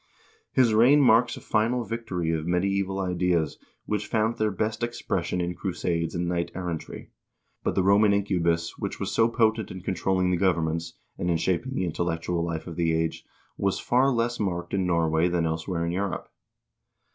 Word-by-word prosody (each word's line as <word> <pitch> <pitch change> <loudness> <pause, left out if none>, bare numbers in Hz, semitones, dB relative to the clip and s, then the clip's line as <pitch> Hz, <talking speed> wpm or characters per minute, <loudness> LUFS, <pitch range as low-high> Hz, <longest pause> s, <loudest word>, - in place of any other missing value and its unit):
I - - +7
lis 120 -3 +4
reign 125 +7 +6
marks 120 -2 +4
a - - -10
final 115 +3 +1
victory 110 -8 -3
of 80 0 -2
medieval 95 +2 0
ideas, 90 -4 0 0.3
which 105 -1 -2
found 110 +1 0
their 110 0 +2
best 110 +3 -2
expression 120 -5 -2
in 90 0 -1
crusades 85 -3 -2
and 85 0 -1
knight 85 -1 -1
errantry, 85 -3 -5 0.5
but - - -1
the 95 - +2
Roman 100 +2 +5
incubus, 85 -4 0
which - - -4
was - - -2
so 115 - +4
potent 110 -2 +1
in 95 - -7
controlling 95 0 0
the 90 - +2
governments, 85 -3 0 0.3
and 90 - -1
in 85 - +2
shaping 95 +11 -1
the 95 - 0
intellectual 85 0 -1
life 85 -1 -3
of 85 -2 -8
the 85 -1 +2
age, 80 0 -1 0.3
was 100 -1 0
far 130 +3 +3
less 120 -1 0
marked 90 -3 -2
in 95 -2 +1
Nor 85 -2 +2
way 80 +2 +2
than 85 -1 0
elsewhere 85 +2 -2
in 85 - -1
Europe. 95 +1 -3
90 Hz, 180 wpm, -26 LUFS, 85-110 Hz, 0.5 s, I